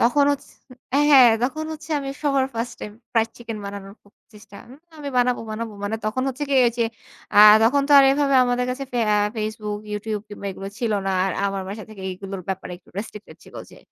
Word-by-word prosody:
তখন 280 +4 +4
হচ্ছ 285 - -6 0.6
হ্যাঁ, 255 -4 +8
তখন 310 +5 -1
হচ্ছে 310 +1 -10
আমি 275 - -5
সবার 275 -3 +2
first 230 +1 -3
time 210 - -7 0.2
fried 225 -1 +2
chicken 230 -2 -7
বানানোর 200 0 -8 0.4
চেষ্টা। 210 -1 -14 0.4
আমি 290 -2 -6
বানাবো, 245 0 +2
বানাবো। 220 +1 -5
মানে 220 +2 -2
তখন 215 +4 -1
হচ্ছে 270 +3 -4
কি - - +2
এইযে 235 0 0 0.5
আ - - +7 0.2
তখন 270 +5 +3
তো - - +3
আর 275 - +7
এভাবে 280 0 +1
আমাদের 245 0 0
কাছে 275 +2 -4
ফে 245 - -1 0.2
আ - - +3 0.2
Facebook, 215 -1 -4
YouTube 210 0 -3
কিংবা 205 -1 -8
এগুলো 195 +1 -7
ছিল 230 -3 -1
না। - - +1
আর 195 - -1
আমার 195 -1 -3
বাসা 210 +2 -6
থেকে 200 -3 -11
এগুলোর 190 0 -7
ব্যাপারে 190 -1 -4
একটু 175 - -24
রেস্ট্রিকটেড 210 0 -8
ছিল। - - -17 0.2
যে - - -15
225 Hz, 200 wpm, -22 LUFS, 205-260 Hz, 0.6 s, হ্যাঁ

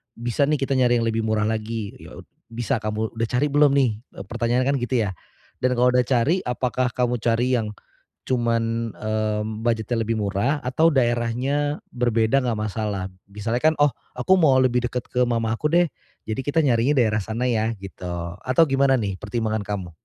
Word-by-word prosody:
bisa 120 +4 0
nih 150 -3 +1
kita 135 -1 0
nyari 120 -2 +3
yang - - 0
lebih 110 0 -1
murah 110 -1 +1
lagi, 110 -1 -2
ya - - -12
od - - -10 0.2
bisa 115 -1 -2
kamu 110 0 -3
udah 115 - +1
cari 140 +4 0
belum 145 -1 +4
nih? 135 -4 +4 0.3
Eee, 95 - -7
pertanyaanya 120 +4 0
kan 140 - 0
gitu 125 +1 -2
ya, 95 - -2 0.5
dan 125 0 +1
kalau 125 +1 +4
udah 125 -1 +2
cari 135 +8 +2
apakah 125 +1 0
kamu 125 -1 0
cari 120 +2 +1
yang 105 -1 -5 0.5
cuman, 115 -2 0
mmm, 110 0 -2
budget-nya 115 0 0
lebih 110 0 -1
murah 105 +9 0
atau 155 +6 +2
daerahnya 130 +4 0
berbeda 120 +1 +1
nggak 115 -3 -1
masalah? 105 -3 -3 0.2
Misalnya 105 +4 -3 0.2
kan, - - -5
"Oh 145 - +6 0.2
aku 190 0 +2
mau 140 -7 +4
lebih 125 -1 +2
dekat 125 0 -3
ke 125 0 +1
mamaku 115 +2 -1
deh 175 0 +5 0.4
jadi 110 - -2
kita 145 +3 +1
nyarinya 130 -2 +3
daerah 110 -2 +2
sana 115 +3 -2
ya." 115 -1 +1
Gitu, 95 -2 -8 0.4
atau 130 +6 +4
gimana 135 -2 +3
nih 100 -3 -2
pertimbangan 110 +1 -2
kamu? 95 -4 -4
120 Hz, 185 wpm, -23 LUFS, 110-130 Hz, 0.5 s, Oh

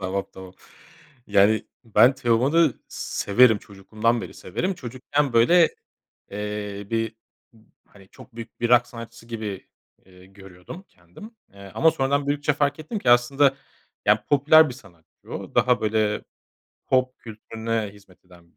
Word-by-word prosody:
Tamam, 95 +1 -2
tamam, 95 -1 -12 0.7
yani, 105 +2 +3 0.2
ben 115 +4 +4
Teoman'ı 130 +4 +2
severim, 110 +1 +2
çocukluğumdan 110 +4 -2
beri - - -9
severim. 190 +1 -3
Çocukken, 130 0 -3
böyle, 165 +9 +5 0.6
eee, 105 -1 -5
bir, 115 -1 -2 0.7
hani 95 -2 -19
çok 125 - -17
büyük 115 0 -10
bir 120 - 0
rock 125 0 +5
sanatçısı 115 0 -11
gibi, 110 -4 -6 0.4
ııı, 90 0 -18
görüyordum 95 - -13
kendim, 90 - -15 0.2
eee, 100 -1 -12
ama 160 - +4
sonradan 140 +1 -1
büyüdükçe 145 0 0
fark 145 +1 -1
ettim 205 +8 -5
ki 120 - +1
aslında, 135 +3 +4 0.5
ya, - - +3
popüler 150 +2 +5
bir 125 - -7
sanatçı 85 -9 -20
o, - - -7
daha, 125 -1 +3
böyle, 110 -1 0 0.6
pop 130 -1 0
kültürüne 110 -1 -5
hizmet 95 -3 -21
eden 85 -2 -21
115 Hz, 135 wpm, -23 LUFS, 100-135 Hz, 0.7 s, böyle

